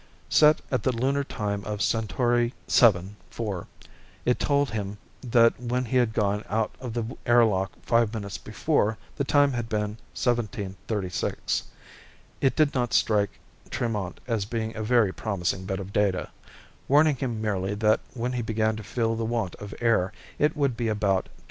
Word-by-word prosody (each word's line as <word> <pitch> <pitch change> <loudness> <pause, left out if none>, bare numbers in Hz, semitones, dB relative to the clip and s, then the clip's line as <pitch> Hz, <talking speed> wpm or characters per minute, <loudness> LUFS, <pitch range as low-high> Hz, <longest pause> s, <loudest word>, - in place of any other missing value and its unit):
Set 150 0 +5
at 130 - +1
the 130 - +1
lunar 135 +4 0
time 100 -6 -3
of 105 0 -4
Centauri 120 +3 +1
VII 100 -5 +4 0.2
4, 100 -6 -4 0.6
it 125 - +2
told 140 -3 +2
him 105 -2 -4 0.2
that 115 -2 +4
when 125 +1 -1
he 130 +3 0
had 120 -3 +3
gone 105 -1 0
out 110 +1 0
of 125 -3 -5
the 120 +1 -3
airlock 110 -6 +4
five 115 -2 +3
minutes 100 -3 -5
before 110 -1 0 0.2
the - - +1
time 145 +1 +4
had 120 -2 -3
been 105 0 -2 0.2
17:36. 105 -5 -2 0.8
It 135 - +3
did 155 -2 +3
not 120 -3 0
strike 105 -3 +2 0.3
Tremont 105 -6 -2
as 115 -5 -1
being 110 0 -3
a 110 - -4
very 110 -3 +3
promising 95 -3 -2
bit 95 0 -2
of 100 +1 -7
data 100 -4 +1 0.6
warning 150 +1 +5
him 120 -3 -2
merely 100 -2 -1
that 105 +1 +3 0.2
when 125 +1 -2
he 125 - -1
began 110 -1 0
to 110 - -7
feel 115 +2 -1
the 115 - -2
want 110 -5 -1
of 105 -1 -8
air, 115 -6 +2 0.3
it 150 +1 +2
would 140 -4 +1
be 115 0 -1
about 105 -3 +1
21:30. - - -21
110 Hz, 165 wpm, -26 LUFS, 105-120 Hz, 0.8 s, Set